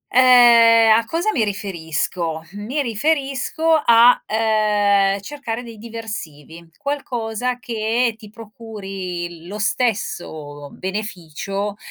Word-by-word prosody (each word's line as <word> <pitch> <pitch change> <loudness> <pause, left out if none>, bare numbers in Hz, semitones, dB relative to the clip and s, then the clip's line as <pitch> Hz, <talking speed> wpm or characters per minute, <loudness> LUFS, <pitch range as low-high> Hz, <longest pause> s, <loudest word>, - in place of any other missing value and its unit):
Ehm, 235 -3 +7
a 230 - -1
cosa 340 - -1
mi 230 - +1
riferisco? 170 -5 -3
Mi 225 +9 -3
riferisco 275 +5 -1 0.2
a, 235 +1 +6
ehm, 210 -3 +2
cercare 245 -2 -6
dei 230 -2 -11
diversivi, 170 -8 -9
qualcosa 250 -4 -3
che 230 0 -1
ti 215 -2 -13
procuri 195 -6 -7
lo 205 +2 -6
stesso 160 - -3
beneficio, 195 0 -5
215 Hz, 95 wpm, -20 LUFS, 195-235 Hz, 0.2 s, Ehm